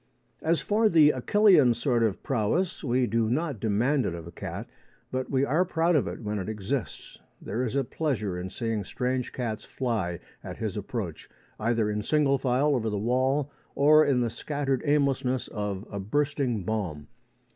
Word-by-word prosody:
As 165 +1 +1
for 215 +1 +2
the 155 -4 +6
Achillean 150 - +4
sort 120 -3 +1
of 110 -4 0
prowess, 145 - 0
we 125 -2 +2
do 115 0 +1
not 145 -1 -1
demand 120 +7 +1
it 85 - -3
of 85 -2 -8
a 85 - -9
cat, - - -6 0.4
but 130 0 -2
we 135 0 +2
are 155 +6 +2
proud 170 -1 +1
of 145 - +2
it - - -6
when 105 -1 -3
it 95 - -4
exists. 110 +4 -4 0.2
There 110 +6 -3
is 125 +1 -2
a 140 - +2
pleasure 120 - -2
in 90 +1 -4
seeing 115 0 -2
strange 125 +5 -2
cats 115 -4 -4
fly 105 - -2 0.2
at - - -7
his - - -3
approach, - - -5 0.3
either 115 0 +1
in 105 0 -1
single 140 +2 +2
file 135 +3 +2
over 115 -4 0
the 105 - -2
wall 130 +6 +1 0.2
or 155 +2 +6
in 130 -4 +2
the 120 -2 0
scattered 140 -2 -2
aimlessness 135 -3 +1
of 105 -2 -4
a 100 - -4
bursting 130 0 0
bomb. 90 -8 -3
125 Hz, 180 wpm, -27 LUFS, 110-145 Hz, 0.4 s, the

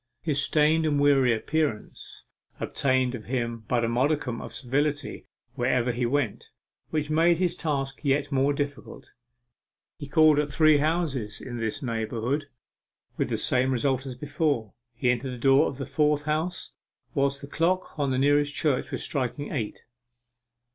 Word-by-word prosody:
His 145 -4 +1
stained 155 +2 +3
and 145 -2 +1
weary 140 -3 +4
appearance 115 0 -2 0.3
obtained 130 -2 +1
for 125 - -4
him 115 -1 -3
but 120 -2 +1
a - - 0
modicum 125 0 0
of - - -8
civility, 145 +3 -1 0.3
wherever 125 -1 +1
he 120 0 -1
went, 130 -4 -1 0.4
which 155 -1 -2
made 165 +2 +4
his 180 -1 0
task 135 -3 -2
yet 140 0 0
more 135 +1 +2
difficult. 145 -1 -5 0.9
He 145 - -6
called 155 -1 +5
at 150 - 0
three 155 -2 +5
several 150 +2 +2
houses 130 -11 -3
in 120 -1 -7
this 115 +3 -3
neighbourhood, 115 +4 -2 0.7
with - - -1
the - - -1
same 130 +1 +3
result 130 +1 0
as 130 - -6
before. 145 - -1 0.2
He 125 +1 +2
entered 125 +2 -2
the - - -6
door 135 +5 +4
of 135 - -6
the 135 - -4
fourth 150 -1 +1
house 155 +4 -2 0.4
whilst 140 -2 0
the 140 - -8
clock 175 +5 0
of 140 -2 +1
the 130 - 0
nearest 145 +1 +2
church 145 -5 0
was - - -4
striking 140 +1 -3
eight. 115 -7 -4
140 Hz, 160 wpm, -26 LUFS, 125-150 Hz, 0.9 s, called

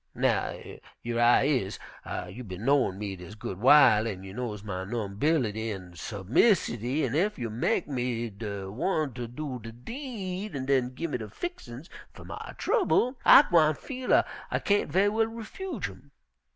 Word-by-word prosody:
Now - - 0 0.4
yer 120 0 -2
I 120 +2 +5
is, 130 -9 0 0.5
you 125 - -8
bin 95 0 -7
knowin' 135 -9 +3
me 100 -1 -4
dis 90 +3 -10
good 95 -3 -6
w'ile, 120 -4 +6
an' 95 -4 -5
you 95 0 -9
knows 110 -3 -5
my 95 -3 -4
numbility 110 +2 -1
an' 90 -3 -7
submissity, 120 - +1
an' 125 - -3
ef 190 +8 +1
you 115 -3 -4
mek 115 +3 0
me 120 -4 -2
de 100 -2 -6
one 150 - -1
ter 120 0 -5
do 130 +1 -5
de 115 +1 -8
deed 200 - -6
an' 130 -1 -3
den 130 -2 +1
give 165 +2 -4
me - - -2
de 110 -2 -7
fixin's 140 - -7 0.3
fer - - -12
my - - -8
trouble, 365 - +1
I - - +9
gwine 155 - +4
feel 260 - -7
dat - - +5 0.2
I - - 0
kain't 205 -7 +1
ve'y 190 +5 +4
well 220 +2 +2
refuge 230 - -5
'em.' 95 +9 -14
125 Hz, 175 wpm, -28 LUFS, 105-170 Hz, 0.5 s, I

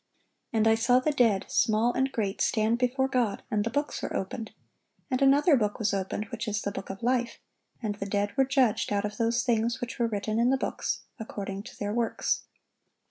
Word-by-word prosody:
And 225 -1 +2
I 220 - +6
saw 235 +3 +3
the 300 +4 +1
dead, 230 -8 +3
small 225 +2 +3
and 265 +1 +1
great, 205 -5 -2
stand 225 +1 +2
before 260 +2 +1
God; 245 -6 0
and 210 -1 +1
the 230 - -1
books 290 +5 -2
were - - -4
opened: 220 +4 -4 0.6
and 255 - 0
another 285 +4 +5
book 210 -5 0
was 205 -2 0
opened, 195 +2 -2
which 235 0 -4
is 210 -1 -1
the 200 - -2
book 195 -1 -7
of 195 +3 -7
life: 245 -1 +1 0.5
and 210 -2 -1
the 200 -1 -5
dead 205 0 -1
were 270 - +4
judged 260 -7 +2
out 200 0 +1
of 210 0 -5
those 230 +1 +1
things 230 -1 +1
which 245 0 -5
were 235 - +2
written 215 0 -2
in 240 +1 +4
the 270 - +3
books, - - -2 0.2
according 200 -3 -5
to 225 - -12
their 205 0 -2
works." 230 -1 0
225 Hz, 210 wpm, -28 LUFS, 205-250 Hz, 0.6 s, I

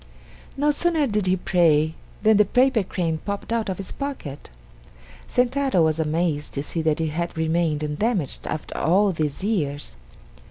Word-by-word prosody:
No 295 +2 +3
sooner 320 0 +1
did 210 -6 0
he 185 - +3
pray 160 -4 +2 0.3
than 220 -1 +5
the 210 - +5
paper 250 +2 +3
crane 170 -4 -2
popped 200 +2 -4
out 225 -3 -1
of 185 - -2
his 195 - -4
pocket. 270 - -6 0.8
Sentaro 250 -6 +2
was 160 0 +1
amazed 160 -1 -1
to 140 - -2
see 165 +2 -2
that 160 -1 +1
it 160 -1 0
had 170 +2 -3
remained 160 -1 0
undamaged 155 - -1
after 155 - -5
all 195 +6 +3
these 155 -1 -2
years. 145 - -2
175 Hz, 160 wpm, -23 LUFS, 155-220 Hz, 0.8 s, than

